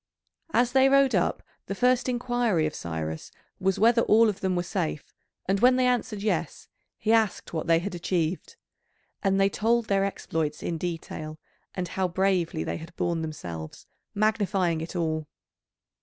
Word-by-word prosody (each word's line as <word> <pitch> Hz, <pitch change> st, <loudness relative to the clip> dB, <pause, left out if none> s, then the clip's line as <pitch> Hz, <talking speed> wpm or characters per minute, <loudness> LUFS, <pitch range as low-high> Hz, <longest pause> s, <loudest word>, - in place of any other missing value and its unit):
As 245 Hz, -2 st, +2 dB
they 265 Hz, 0 st, +5 dB
rode 275 Hz, -2 st, +4 dB
up 180 Hz, -, +1 dB, 0.2 s
the 195 Hz, -, -3 dB
first 250 Hz, +3 st, +2 dB
inquiry 240 Hz, -8 st, +1 dB
of 155 Hz, -, -2 dB
Cyrus 80 Hz, -1 st, -5 dB, 0.3 s
was 190 Hz, 0 st, +1 dB
whether 230 Hz, +2 st, +4 dB
all 225 Hz, 0 st, +5 dB
of 200 Hz, -, -4 dB
them 190 Hz, -1 st, 0 dB
were 175 Hz, -, 0 dB
safe, 170 Hz, -5 st, -3 dB, 0.3 s
and 195 Hz, +1 st, +1 dB
when 250 Hz, +3 st, +5 dB
they 255 Hz, 0 st, +2 dB
answered 230 Hz, -4 st, 0 dB
yes, 175 Hz, -7 st, -2 dB, 0.3 s
he 220 Hz, -, 0 dB
asked 220 Hz, -6 st, +1 dB
what 160 Hz, 0 st, -3 dB
they 165 Hz, 0 st, +5 dB
had 180 Hz, +4 st, -3 dB
achieved. 175 Hz, -, -2 dB, 0.7 s
And 195 Hz, -1 st, +2 dB
they 195 Hz, -, +5 dB
told 225 Hz, +3 st, +1 dB
their 195 Hz, -1 st, +3 dB
exploits 160 Hz, -6 st, -3 dB
in 165 Hz, -2 st, -2 dB
detail, 155 Hz, -2 st, -5 dB, 0.4 s
and 180 Hz, -2 st, -3 dB
how 190 Hz, +1 st, 0 dB
bravely 180 Hz, -3 st, 0 dB
they -, -, -3 dB
had 165 Hz, +1 st, -11 dB
borne 170 Hz, -2 st, -1 dB
themselves, 85 Hz, -, -7 dB, 0.3 s
magnifying 200 Hz, -5 st, +1 dB
it 165 Hz, +3 st, -7 dB
all. 155 Hz, -3 st, -1 dB
190 Hz, 165 wpm, -27 LUFS, 165-220 Hz, 0.7 s, they